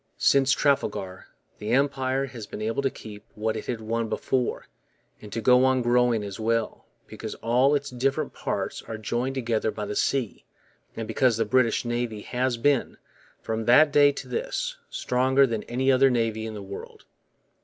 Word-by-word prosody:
Since 135 Hz, -1 st, +4 dB
Trafalgar 95 Hz, -9 st, -1 dB, 0.3 s
the 105 Hz, -, -5 dB
Empire 135 Hz, 0 st, +1 dB
has 120 Hz, -5 st, -9 dB
been -, -, -8 dB
able 115 Hz, +4 st, -1 dB
to 135 Hz, -, +1 dB
keep 105 Hz, -4 st, -11 dB
what 110 Hz, +1 st, -1 dB
it -, -, -6 dB
had 120 Hz, -3 st, -3 dB
won 115 Hz, +1 st, -2 dB
before, 125 Hz, +1 st, -1 dB, 0.6 s
and 105 Hz, -, -11 dB
to 115 Hz, -, -3 dB
go 125 Hz, +3 st, +5 dB
on 130 Hz, -1 st, +3 dB
growing 120 Hz, -2 st, +2 dB
as 100 Hz, 0 st, -7 dB
well, 115 Hz, 0 st, -1 dB, 0.2 s
because -, -, -7 dB
all 125 Hz, +5 st, +2 dB
its 145 Hz, -1 st, -2 dB
different 130 Hz, +2 st, -1 dB
parts -, -, -3 dB
are 110 Hz, -, -7 dB
joined 120 Hz, +5 st, -2 dB
together 115 Hz, -4 st, 0 dB
by 105 Hz, -1 st, -4 dB
the 105 Hz, -, -5 dB
sea, 130 Hz, -3 st, -1 dB, 0.5 s
and 115 Hz, -1 st, -5 dB
because 125 Hz, -4 st, +2 dB
the 115 Hz, -, +1 dB
British 120 Hz, +1 st, +2 dB
Navy 120 Hz, -3 st, -2 dB
has 125 Hz, +2 st, -1 dB
been, 140 Hz, +2 st, +1 dB, 0.5 s
from 110 Hz, 0 st, -3 dB
that 145 Hz, +5 st, +6 dB
day 145 Hz, 0 st, +6 dB
to -, -, -7 dB
this, -, -, -3 dB
stronger 130 Hz, +2 st, +2 dB
than 115 Hz, -4 st, -2 dB
any 130 Hz, +3 st, +1 dB
other 135 Hz, +1 st, +5 dB
navy 115 Hz, -3 st, -1 dB
in 110 Hz, -, -6 dB
the 100 Hz, -, -7 dB
world. 100 Hz, 0 st, -10 dB
120 Hz, 175 wpm, -26 LUFS, 110-135 Hz, 0.6 s, that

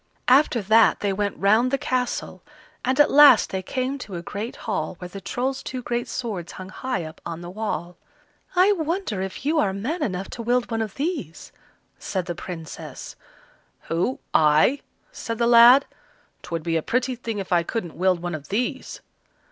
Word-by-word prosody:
After 255 Hz, -3 st, +4 dB
that 220 Hz, +3 st, +4 dB
they 200 Hz, -1 st, 0 dB
went 200 Hz, +1 st, -2 dB
round 215 Hz, +5 st, +3 dB
the 275 Hz, -, +1 dB
castle, 255 Hz, -2 st, -2 dB, 0.4 s
and 260 Hz, +2 st, 0 dB
at 295 Hz, -, +6 dB
last 295 Hz, 0 st, +7 dB
they 190 Hz, -, -2 dB
came 260 Hz, +7 st, -3 dB
to 200 Hz, -7 st, -7 dB
a 170 Hz, -, -5 dB
great 210 Hz, +6 st, -5 dB
hall, 210 Hz, -4 st, -2 dB
where 180 Hz, -, -7 dB
the 195 Hz, +2 st, -9 dB
Trolls' 260 Hz, +7 st, -2 dB
two 255 Hz, -1 st, -6 dB
great 240 Hz, 0 st, -2 dB
swords 205 Hz, -9 st, -5 dB
hung 185 Hz, 0 st, -9 dB
high 255 Hz, -1 st, -3 dB
up 155 Hz, 0 st, -10 dB
on 170 Hz, 0 st, -6 dB
the 175 Hz, 0 st, -8 dB
wall. 180 Hz, -4 st, -4 dB, 0.6 s
"I 370 Hz, +3 st, +5 dB
wonder 330 Hz, -, -2 dB
if 190 Hz, +7 st, -6 dB
you 310 Hz, +2 st, +2 dB
are 195 Hz, -9 st, +1 dB
man 260 Hz, -, -3 dB
enough 195 Hz, -8 st, -2 dB
to 235 Hz, -, -6 dB
wield 245 Hz, +1 st, 0 dB
one 225 Hz, 0 st, -1 dB
of 215 Hz, -3 st, -4 dB
these," 285 Hz, -, -4 dB, 0.5 s
said 185 Hz, -3 st, -3 dB
the 175 Hz, -, -3 dB
Princess. 165 Hz, -2 st, -8 dB, 0.7 s
"Who? 180 Hz, +11 st, 0 dB, 0.2 s
I?" 155 Hz, -, +4 dB, 0.3 s
said 230 Hz, -, -5 dB
the 235 Hz, -, +1 dB
lad. 240 Hz, +3 st, +8 dB, 0.6 s
"'Twould 165 Hz, -2 st, -5 dB
be 165 Hz, 0 st, 0 dB
a -, -, 0 dB
pretty 255 Hz, +7 st, 0 dB
thing 230 Hz, -2 st, -5 dB
if 195 Hz, -2 st, -5 dB
I 175 Hz, -, +4 dB
couldn't 175 Hz, -1 st, -4 dB
wield 180 Hz, -1 st, +1 dB
one 175 Hz, 0 st, -3 dB
of 150 Hz, -2 st, -7 dB
these." 250 Hz, +7 st, -3 dB
220 Hz, 185 wpm, -24 LUFS, 180-255 Hz, 0.7 s, lad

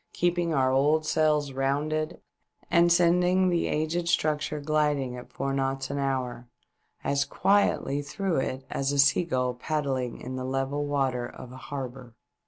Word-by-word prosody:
keeping 175 Hz, -1 st, +1 dB
our 130 Hz, -4 st, +2 dB
old 150 Hz, +4 st, +3 dB
sails 150 Hz, -2 st, +2 dB
rounded, 150 Hz, +4 st, -1 dB, 0.5 s
and 170 Hz, 0 st, +5 dB
sending 180 Hz, +2 st, +4 dB
the 175 Hz, -1 st, +1 dB
aged 165 Hz, +3 st, -1 dB
structure 155 Hz, -2 st, 0 dB
gliding 145 Hz, -3 st, 0 dB
at 125 Hz, -, -10 dB
four 135 Hz, -, -2 dB
knots 135 Hz, 0 st, -1 dB
an 140 Hz, -, -2 dB
hour 130 Hz, -3 st, -2 dB, 0.6 s
as 140 Hz, 0 st, +1 dB
quietly 195 Hz, -8 st, +1 dB
through 190 Hz, +5 st, -2 dB
it 130 Hz, 0 st, -2 dB
as 135 Hz, 0 st, -1 dB
a 145 Hz, -, -1 dB
seagull 135 Hz, -3 st, +3 dB
paddling 130 Hz, -2 st, -2 dB
In 130 Hz, +1 st, -6 dB
the 130 Hz, -, -4 dB
level 135 Hz, +2 st, -2 dB
water 135 Hz, -4 st, 0 dB
of 125 Hz, -, -11 dB
an 130 Hz, -, -10 dB
harbour. 130 Hz, -3 st, -7 dB
140 Hz, 150 wpm, -27 LUFS, 130-155 Hz, 0.6 s, and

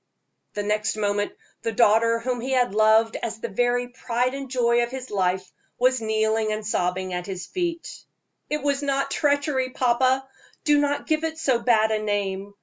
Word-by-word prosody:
The 205 Hz, -, -2 dB
next 210 Hz, +1 st, 0 dB
moment 205 Hz, -1 st, -1 dB, 0.3 s
the 225 Hz, -, -2 dB
daughter 230 Hz, +1 st, +4 dB
whom 245 Hz, +1 st, -3 dB
he 265 Hz, +2 st, -2 dB
had 245 Hz, -6 st, +2 dB
loved 220 Hz, +1 st, +4 dB
as 225 Hz, -1 st, -5 dB
the -, -, -4 dB
very 245 Hz, +3 st, 0 dB
pride 245 Hz, 0 st, -1 dB
and 275 Hz, -1 st, -6 dB
joy 240 Hz, -2 st, +2 dB
of 240 Hz, -, -1 dB
his 260 Hz, 0 st, -7 dB
life, 185 Hz, -2 st, -1 dB, 0.2 s
was 255 Hz, 0 st, +2 dB
kneeling 220 Hz, 0 st, +1 dB
and 215 Hz, 0 st, -3 dB
sobbing 185 Hz, -3 st, -1 dB
at 180 Hz, +1 st, -4 dB
his 185 Hz, -2 st, -5 dB
feet. 340 Hz, -, -4 dB, 0.5 s
"It 300 Hz, -1 st, -2 dB
was 285 Hz, -1 st, +1 dB
not 275 Hz, -1 st, -1 dB
treachery, 285 Hz, -3 st, +1 dB
papa; 255 Hz, +1 st, +1 dB, 0.4 s
do 295 Hz, -1 st, +4 dB
not 285 Hz, 0 st, 0 dB
give 310 Hz, 0 st, 0 dB
it 320 Hz, 0 st, -2 dB
so 265 Hz, -7 st, +1 dB
bad 225 Hz, -2 st, +3 dB
a 215 Hz, -1 st, 0 dB
name. 200 Hz, -1 st, -2 dB
235 Hz, 180 wpm, -24 LUFS, 215-265 Hz, 0.5 s, daughter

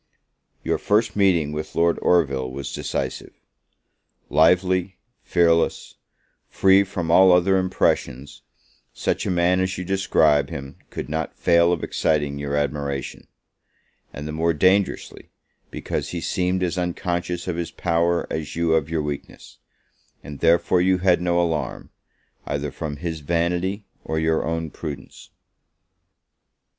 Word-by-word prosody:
Your -, -, -1 dB
first 105 Hz, +1 st, +1 dB
meeting 90 Hz, -7 st, +2 dB
with 75 Hz, +1 st, -6 dB
Lord 85 Hz, 0 st, +2 dB
Orville 70 Hz, -7 st, +2 dB
was 70 Hz, +2 st, -6 dB
decisive. -, -, -4 dB, 0.9 s
Lively, 90 Hz, +4 st, +3 dB, 0.2 s
fearless, 85 Hz, -1 st, +1 dB, 0.6 s
free 95 Hz, +1 st, +4 dB
from 90 Hz, -4 st, -4 dB
all 95 Hz, +2 st, +7 dB
other 90 Hz, +2 st, +4 dB
impressions, 75 Hz, -7 st, -1 dB, 0.5 s
such -, -, -1 dB
a -, -, 0 dB
man 90 Hz, 0 st, +2 dB
as 95 Hz, 0 st, -1 dB
you 90 Hz, -, -5 dB
describe 80 Hz, -7 st, +2 dB
him 70 Hz, 0 st, -8 dB
could -, -, -6 dB
not 80 Hz, 0 st, -4 dB
fail 85 Hz, 0 st, +4 dB
of 85 Hz, -, -1 dB
exciting 75 Hz, -2 st, 0 dB
your 70 Hz, 0 st, -3 dB
admiration; 70 Hz, -1 st, -3 dB, 0.8 s
and 75 Hz, -, -7 dB
the -, -, -4 dB
more 80 Hz, +2 st, 0 dB
dangerously, 95 Hz, +5 st, 0 dB, 0.4 s
because -, -, -4 dB
he 85 Hz, -, -4 dB
seemed 90 Hz, +1 st, -1 dB
as 90 Hz, 0 st, -1 dB
unconscious 90 Hz, 0 st, -3 dB
of 90 Hz, -, -2 dB
his 85 Hz, -2 st, -3 dB
power 85 Hz, 0 st, 0 dB
as 75 Hz, -3 st, -4 dB
you 85 Hz, -1 st, +1 dB
of 80 Hz, -1 st, +1 dB
your 80 Hz, -2 st, -1 dB
weakness; 70 Hz, -1 st, -7 dB, 0.6 s
and 75 Hz, -1 st, -9 dB
therefore 85 Hz, +2 st, +3 dB
you 95 Hz, +1 st, +3 dB
had 90 Hz, -1 st, +2 dB
no 85 Hz, 0 st, +1 dB
alarm, 80 Hz, -3 st, -2 dB, 0.6 s
either 70 Hz, 0 st, -3 dB
from 75 Hz, 0 st, -5 dB
his 80 Hz, 0 st, -4 dB
vanity 85 Hz, +6 st, -1 dB, 0.2 s
of 80 Hz, -, -3 dB
your 80 Hz, 0 st, +1 dB
own 80 Hz, -1 st, -3 dB
prudence. 70 Hz, -5 st, -8 dB
85 Hz, 135 wpm, -23 LUFS, 75-90 Hz, 0.9 s, all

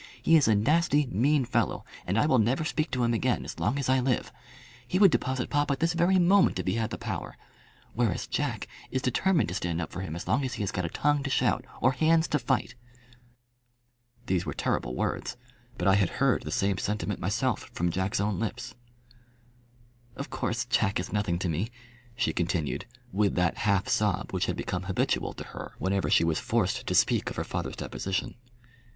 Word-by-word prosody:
He 165 Hz, -, +4 dB
is 155 Hz, -, +5 dB
a 110 Hz, -, +5 dB
nasty 150 Hz, +6 st, +3 dB
mean 135 Hz, +6 st, +2 dB
fellow, 120 Hz, -, 0 dB, 0.2 s
and 95 Hz, +4 st, 0 dB
I 115 Hz, -, +4 dB
will 130 Hz, -5 st, +4 dB
never 120 Hz, +8 st, +2 dB
speak 155 Hz, 0 st, -1 dB
to 125 Hz, -1 st, -1 dB
him 120 Hz, 0 st, +2 dB
again 120 Hz, +2 st, 0 dB
as -, -, -7 dB
long 135 Hz, -, 0 dB
as 140 Hz, -, -1 dB
I 130 Hz, 0 st, +3 dB
live. 125 Hz, -1 st, 0 dB, 0.6 s
He 180 Hz, -, 0 dB
would 195 Hz, -2 st, +7 dB
deposit 130 Hz, -4 st, -1 dB
papa 145 Hz, -1 st, +1 dB
this 165 Hz, +1 st, +2 dB
very 175 Hz, +3 st, +3 dB
moment 185 Hz, +2 st, +4 dB
if -, -, -3 dB
he -, -, +1 dB
had 115 Hz, -1 st, -1 dB
the -, -, -5 dB
power. -, -, -5 dB, 0.6 s
Whereas 115 Hz, -6 st, 0 dB
Jack -, -, -2 dB, 0.2 s
is 130 Hz, -, -2 dB
determined 165 Hz, -, +2 dB
to -, -, -4 dB
stand 85 Hz, -3 st, -2 dB
up 80 Hz, -, -4 dB
for 90 Hz, -, -5 dB
him 80 Hz, -4 st, -5 dB
as 85 Hz, -, -6 dB
long 135 Hz, +5 st, +2 dB
as 130 Hz, -, -3 dB
he -, -, -3 dB
has 100 Hz, -, -2 dB
got 90 Hz, -, -2 dB
a -, -, -2 dB
tongue 145 Hz, -, +1 dB
to 135 Hz, -, -3 dB
shout -, -, +1 dB, 0.2 s
or 130 Hz, -, +5 dB
hands 160 Hz, +5 st, +3 dB
to 150 Hz, -, +1 dB
fight." 115 Hz, -1 st, 0 dB, 1.5 s
These 90 Hz, -4 st, 0 dB
were -, -, -5 dB
terrible 60 Hz, -, -1 dB
words, 120 Hz, -, -2 dB, 0.4 s
but 90 Hz, -, -1 dB
I 95 Hz, -, +6 dB
had 95 Hz, -3 st, +3 dB
heard -, -, +3 dB
the -, -, -6 dB
same 100 Hz, -1 st, +1 dB
sentiment 105 Hz, -1 st, -2 dB
myself 115 Hz, +8 st, -1 dB
from 85 Hz, 0 st, 0 dB
Jack's 95 Hz, +2 st, -1 dB
own 100 Hz, -1 st, 0 dB
lips. 115 Hz, +2 st, -4 dB, 1.4 s
"Of 140 Hz, -, -6 dB
course 120 Hz, +1 st, -1 dB
Jack 110 Hz, -6 st, +1 dB
is 90 Hz, -, -5 dB
nothing 105 Hz, -5 st, 0 dB
to 90 Hz, -, -2 dB
me," 85 Hz, +7 st, -1 dB, 0.5 s
she 120 Hz, -, 0 dB
continued, 85 Hz, -, -1 dB, 0.2 s
with 100 Hz, -1 st, +1 dB
that 90 Hz, -1 st, +1 dB
half 100 Hz, -1 st, +2 dB
sob 105 Hz, -4 st, 0 dB
which -, -, 0 dB
had -, -, -1 dB
become 90 Hz, +1 st, -3 dB
habitual 95 Hz, -, 0 dB
to -, -, -7 dB
her -, -, -7 dB
whenever 95 Hz, +1 st, 0 dB
she -, -, +5 dB
was 80 Hz, -1 st, +1 dB
forced 110 Hz, -6 st, 0 dB
to -, -, 0 dB
speak -, -, +3 dB
of -, -, -7 dB
her -, -, -2 dB
father's -, -, -4 dB
deposition. 95 Hz, -1 st, -3 dB
115 Hz, 205 wpm, -28 LUFS, 95-135 Hz, 1.5 s, would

